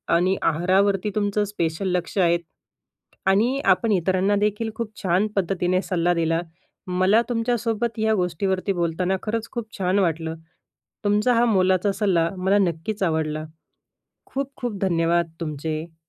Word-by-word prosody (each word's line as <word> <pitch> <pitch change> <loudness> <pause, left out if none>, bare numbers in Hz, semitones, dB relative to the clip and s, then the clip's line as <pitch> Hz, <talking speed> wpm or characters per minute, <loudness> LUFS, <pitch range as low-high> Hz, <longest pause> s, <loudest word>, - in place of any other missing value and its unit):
आणि 185 +3 +2
आहारावरती 190 +5 +2
तुमचं 205 0 +1
स्पेशल 180 -2 -2
लक्ष 180 +3 -3
आहे 170 -2 +4 0.9
आणि 230 +8 +3
आपण 230 -3 +3
इतरांना 190 +2 +2
देखील 210 +2 0
खूप 230 -1 -4
छान 185 +3 +2
पद्धतीने 185 -1 +1
सल्ला 175 -2 +1
दिला. 165 -1 +1 0.5
मला 185 +5 +3
तुमच्यासोबत 230 -1 -1
या 220 0 +2
गोष्टीवरती 185 +2 -1
बोलताना 175 +2 0
खरंच 225 +1 -3
खूप 230 -2 -6
छान 185 +1 +2
वाटलं. 165 -2 -1 0.7
तुमचा 210 +4 +3
हा 235 +1 +4
मोलाचा 190 -2 +2
सल्ला 180 -6 +1
मला 190 +2 +2
नक्कीच 190 +3 -1
आवडला. 155 -2 -1 0.8
खूप 275 0 -4
खूप 235 -5 -4
धन्यवाद 170 -2 +1
तुमचे. 155 +1 -4
190 Hz, 130 wpm, -23 LUFS, 170-210 Hz, 0.9 s, आहे